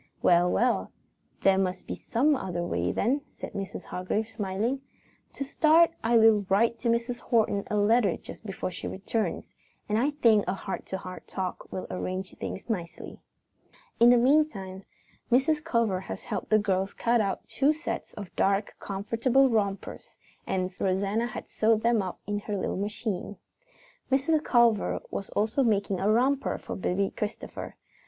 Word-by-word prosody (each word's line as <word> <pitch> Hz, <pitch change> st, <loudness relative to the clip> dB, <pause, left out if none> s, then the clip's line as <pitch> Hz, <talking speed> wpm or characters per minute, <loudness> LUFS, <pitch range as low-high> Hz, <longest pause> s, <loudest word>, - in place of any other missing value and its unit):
"Well, 175 Hz, 0 st, +5 dB
well, 245 Hz, +1 st, +1 dB, 0.5 s
there 195 Hz, 0 st, +4 dB
must 185 Hz, -1 st, -1 dB
be -, -, -4 dB
some 285 Hz, +6 st, +1 dB
other 180 Hz, -7 st, -3 dB
way 90 Hz, -, -1 dB
then," 265 Hz, +7 st, +1 dB, 0.2 s
said -, -, -6 dB
Mrs. 195 Hz, -1 st, -5 dB
Hargrave, 195 Hz, +4 st, -2 dB
smiling. 220 Hz, +5 st, -2 dB, 0.5 s
"To -, -, -4 dB
start, 320 Hz, +4 st, +4 dB
I 230 Hz, +1 st, +4 dB
will 220 Hz, -2 st, +6 dB
write 230 Hz, +4 st, +3 dB
Mrs. 235 Hz, +1 st, 0 dB
Horton 215 Hz, -4 st, +1 dB
a -, -, -1 dB
letter 205 Hz, -2 st, +3 dB
just -, -, -11 dB
before 195 Hz, -3 st, -4 dB
she -, -, -6 dB
returns, 210 Hz, +3 st, -2 dB, 0.4 s
and 210 Hz, +1 st, +1 dB
I 270 Hz, +5 st, +2 dB
think 230 Hz, -8 st, +3 dB
a 185 Hz, -, 0 dB
heart 195 Hz, 0 st, -6 dB
to 190 Hz, -, -3 dB
heart 185 Hz, -1 st, -9 dB
talk 185 Hz, -1 st, -5 dB
will 185 Hz, -, -4 dB
arrange 185 Hz, +1 st, -4 dB
things -, -, -5 dB
nicely." 180 Hz, -8 st, -5 dB, 0.8 s
In 235 Hz, +1 st, +8 dB
the 245 Hz, -, +7 dB
meantime, 235 Hz, -8 st, +1 dB, 0.5 s
Mrs. 295 Hz, +5 st, +3 dB
Culver 230 Hz, -, +1 dB
had 190 Hz, -, -6 dB
helped -, -, -4 dB
the 215 Hz, -, +5 dB
girls 195 Hz, -2 st, 0 dB
cut 235 Hz, 0 st, +2 dB
out 195 Hz, -2 st, -2 dB
two 280 Hz, +2 st, +2 dB
sets 310 Hz, +1 st, -4 dB
of 200 Hz, -3 st, -9 dB
dark, 200 Hz, +1 st, +1 dB
comfortable 230 Hz, +7 st, +1 dB
rompers, 200 Hz, -3 st, -2 dB, 0.3 s
and 185 Hz, 0 st, -1 dB
Rosanna 200 Hz, +5 st, +1 dB
had 230 Hz, -, -7 dB
sewed 220 Hz, 0 st, +2 dB
them 235 Hz, -2 st, +3 dB
up 185 Hz, -2 st, -5 dB
on 205 Hz, 0 st, -1 dB
her 205 Hz, 0 st, -4 dB
little -, -, -2 dB
machine. 205 Hz, 0 st, -3 dB, 0.8 s
Mrs. 295 Hz, +4 st, +2 dB
Culver 235 Hz, -4 st, +3 dB
was 195 Hz, -, -4 dB
also 220 Hz, +6 st, 0 dB
making 200 Hz, -5 st, +1 dB
a 200 Hz, -, +1 dB
romper 265 Hz, +5 st, +2 dB
for -, -, -7 dB
Baby 195 Hz, +1 st, 0 dB
Christopher. 210 Hz, +1 st, -5 dB
210 Hz, 160 wpm, -28 LUFS, 195-240 Hz, 0.8 s, In